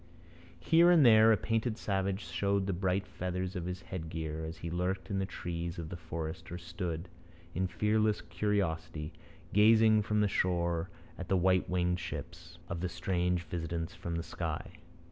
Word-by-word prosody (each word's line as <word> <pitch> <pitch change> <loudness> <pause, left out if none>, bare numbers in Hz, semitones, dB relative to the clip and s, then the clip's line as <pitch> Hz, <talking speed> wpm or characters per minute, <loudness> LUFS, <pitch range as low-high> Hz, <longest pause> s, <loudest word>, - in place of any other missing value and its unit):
Here 170 +2 +5
and 165 -6 +7
there 110 -1 +8
a 110 - +5
painted 115 0 -1
savage 95 -1 -1
showed 95 +4 0
the 100 - -1
bright 95 +2 0
feathers 90 +1 -4
of 90 -2 -3
his 90 0 -5
headgear 80 -3 -4
as 80 +1 -6
he 85 - -5
lurked 90 0 -2
in 95 - 0
the 95 - -1
trees 85 -2 -4
of 80 -2 -5
the - - -5
forest 80 -1 -6
or 90 - -4
stood, 85 0 -4 0.5
in 95 +1 0
fearless 105 +3 +1
curiosity, 80 -4 -2 0.4
gazing 110 +1 +6
from 105 +1 0
the 105 - +4
shore 85 -3 0 0.3
at 90 - -5
the 95 - +2
white 95 +1 +3
winged 90 0 +1
ships 85 0 -7
of 85 - -4
the 90 - -1
strange 90 -1 0
visitants 85 -1 -4
from 85 -1 -5
the 85 - -2
sky. - - -4
90 Hz, 170 wpm, -32 LUFS, 85-100 Hz, 0.5 s, there